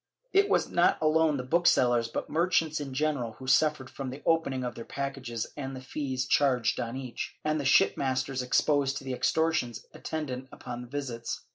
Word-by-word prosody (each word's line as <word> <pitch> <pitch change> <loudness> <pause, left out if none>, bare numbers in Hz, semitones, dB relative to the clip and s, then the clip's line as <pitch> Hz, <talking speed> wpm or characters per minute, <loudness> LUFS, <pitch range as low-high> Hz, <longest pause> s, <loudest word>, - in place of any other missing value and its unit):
^ - - -43
It 400 +1 +4
was - - +2
not - - +3
alone 155 -1 +3
the 125 - -3
booksellers, 125 -6 +3
but 115 - -4
merchants 165 -2 +1
in 140 -2 -5
general, 130 -4 -1
who 130 - -11
suffered 135 +1 +3
from 135 0 -6
the 135 +3 -8
opening 160 -6 +1
of 125 -1 -3
their 115 - -8
packages 135 -4 -4
and 135 -2 -5
the - - -6
fees 130 -1 -3
charged 125 -6 +2
on 120 +1 -3
each, 130 -3 -5
and 155 0 +1
the - - -5
shipmasters 130 0 +2
exposed 135 +1 +2
to - - -7
the 130 -1 -3
extortions 125 -2 0
attend 155 -4 -4
ant 130 +1 -5
upon 120 -1 -7
the 125 - -9
visits. 125 -4 -4
135 Hz, 190 wpm, -29 LUFS, 125-150 Hz, -, It